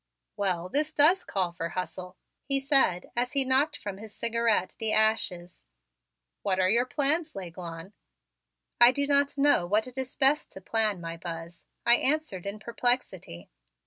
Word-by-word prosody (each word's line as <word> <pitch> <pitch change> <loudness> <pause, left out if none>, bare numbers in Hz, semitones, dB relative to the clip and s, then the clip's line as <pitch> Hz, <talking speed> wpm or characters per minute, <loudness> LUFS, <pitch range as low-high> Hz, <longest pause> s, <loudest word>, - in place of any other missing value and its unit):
"Well, 185 -4 -1
this 295 +9 -1
does 335 +6 +5
call 185 -3 -2
for 170 -1 -5
hustle," 180 +1 -6 0.3
he 275 -1 0
said 270 -10 +1
as 245 +2 -1
he 275 -2 +3
knocked 270 +4 +1
from 200 -1 -7
his 215 0 -11
cigarette 230 -4 0
the 220 -1 +1
ashes. 210 - 0 0.8
"What 190 -1 -1
are 185 0 +3
your 240 +3 +2
plans, 305 +4 +1
L'Aiglon?" 175 0 -8 0.9
"I 240 +1 +8
do 280 +2 -2
not 280 0 +1
know 280 -11 +3
what 210 +4 +1
it 255 +1 -8
is 260 0 -6
best 280 +3 +2
to - - -9
plan, 215 -2 +1
my 165 0 -6
Buzz," 165 0 -8 0.2
I 240 0 +6
answered 270 - -2
in 200 +2 -5
perplexity. 215 - -3
220 Hz, 160 wpm, -27 LUFS, 180-270 Hz, 0.9 s, I